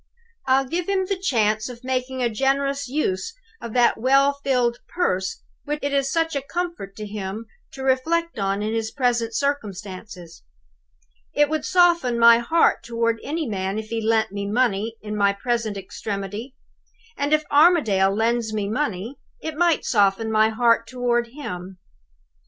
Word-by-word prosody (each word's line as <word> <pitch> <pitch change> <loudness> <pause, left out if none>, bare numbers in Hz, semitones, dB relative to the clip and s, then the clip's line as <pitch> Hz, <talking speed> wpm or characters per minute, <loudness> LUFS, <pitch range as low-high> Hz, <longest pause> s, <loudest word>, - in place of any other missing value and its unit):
I'll 265 +1 +3
give 340 +7 -3
him 385 -1 +1
the 395 - -1
chance 225 - 0
of 245 0 -10
making 255 0 -2
a 240 - +2
generous 275 +3 0
use 275 - -2 0.3
of 230 - -7
that 240 -2 +3
well 275 +3 +4
filled 245 -3 +1
purse 190 - -1 0.2
which 295 +1 -2
it 285 0 -1
is 275 -1 +1
such 325 -2 0
a 280 - 0
comfort 335 - -5
to 215 - -6
him 205 +1 -5 0.3
to 265 - -7
reflect 320 +4 0
on 195 +1 -1
in 215 +1 -2
his 225 -1 -1
present 240 -3 0
circumstances. 200 - -4 0.9
It 295 0 +4
would 315 - -1
soften 345 -9 +3
my 235 0 +7
heart 320 +8 +2
toward 230 -1 -1
any 315 +2 -2
man 195 -1 -2
if 220 0 -5
he 230 -1 -2
lent 220 -1 +1
me 200 0 -4
money 225 -1 0
in 210 0 -4
my 200 -1 +3
present 225 0 -2
extremity; 200 +5 -6 0.6
and, 285 +1 -2
if 305 0 +3
Armadale 285 - +4
lends 230 0 0
me 210 -2 -2
money, 220 0 -3 0.2
it 315 -7 -5
might 340 0 +2
soften 205 0 +2
my 220 0 +4
heart 230 0 +2
toward 240 -1 0
him. 190 -8 -7
235 Hz, 160 wpm, -23 LUFS, 210-280 Hz, 0.9 s, my